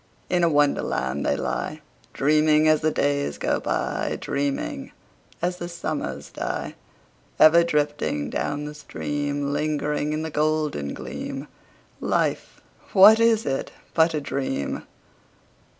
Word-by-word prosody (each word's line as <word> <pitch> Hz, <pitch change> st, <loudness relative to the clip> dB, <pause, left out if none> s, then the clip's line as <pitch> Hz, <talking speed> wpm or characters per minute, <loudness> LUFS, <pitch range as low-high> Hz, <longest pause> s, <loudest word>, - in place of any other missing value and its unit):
In 180 Hz, -1 st, +2 dB
a 170 Hz, -, +5 dB
Wonderland 70 Hz, -, +1 dB
they 70 Hz, -, +1 dB
lie, -, -, -3 dB, 0.3 s
Dreaming 155 Hz, +2 st, +3 dB
as 155 Hz, -1 st, +4 dB
the 155 Hz, -, +2 dB
days 140 Hz, -, 0 dB
go -, -, 0 dB
by, -, -, -2 dB
Dreaming 140 Hz, 0 st, -3 dB, 0.5 s
as 180 Hz, 0 st, 0 dB
the 175 Hz, -1 st, -5 dB
summers 170 Hz, -, -4 dB
die: -, -, -4 dB, 0.7 s
Ever 170 Hz, +2 st, +7 dB
drifting 145 Hz, -, -1 dB
down 145 Hz, 0 st, -2 dB
the 150 Hz, -, -6 dB
stream— 145 Hz, -1 st, -3 dB
Lingering 150 Hz, 0 st, -1 dB
in 155 Hz, +1 st, -2 dB
the 160 Hz, -, -4 dB
golden 150 Hz, -, 0 dB
gleam— -, -, -6 dB, 0.5 s
Life, -, -, -1 dB, 0.3 s
what 210 Hz, +4 st, +8 dB
is 230 Hz, -1 st, +3 dB
it 135 Hz, -1 st, -2 dB, 0.2 s
but 160 Hz, 0 st, +3 dB
a 150 Hz, -, -1 dB
dream? 135 Hz, -, -3 dB
150 Hz, 125 wpm, -24 LUFS, 145-155 Hz, 0.7 s, what